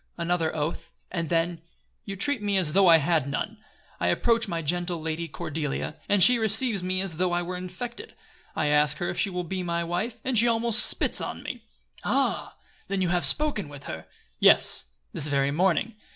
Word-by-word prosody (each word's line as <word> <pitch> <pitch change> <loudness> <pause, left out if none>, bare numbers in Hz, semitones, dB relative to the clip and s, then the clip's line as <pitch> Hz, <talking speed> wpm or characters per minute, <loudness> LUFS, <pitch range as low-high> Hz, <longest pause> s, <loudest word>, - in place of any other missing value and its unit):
" - - -45
!" - - -43
Another 170 -2 -1
oath, 160 +2 -4 0.2
and 170 -4 -3
then, 165 0 0 0.4
"You 195 - -5
treat 270 +5 0
me 205 -1 0
as 165 -5 +1
though 195 0 +5
I 165 -1 +8
had 155 -2 +1
none. 140 - -4 0.4
I 90 - 0
approach 230 - +1
my 170 -3 -3
gentle 175 +2 -2
Lady 160 +1 -3
Cordelia; 155 -1 -4
and 205 -2 +5
she 245 +5 +7
receives 220 -1 +3
me 185 +1 -1
as 185 -5 -4
though 180 0 +1
I 175 0 0
were 180 +1 -5
infected. 185 +7 -7 0.4
I - - 0
ask 150 0 +2
her 175 - -2
if - - -6
she 200 - +1
will 180 -1 -3
be 185 +2 -4
my 170 -1 -2
wife, 180 +8 -3
and 255 -4 +2
she 240 - +4
almost 230 -1 +3
spits - - +1
on - - -6
me." - - -7 0.4
"Ah! - - -1 0.3
Then 195 -1 -1
you 180 - 0
have 175 0 +3
spoken 290 - +1
with 145 -1 -11
her?" 80 -8 -8 0.3
"Yes; - - +5 0.3
this 145 - -1
very 140 -1 +1
morning. 185 +7 +1
175 Hz, 205 wpm, -26 LUFS, 160-200 Hz, 0.4 s, I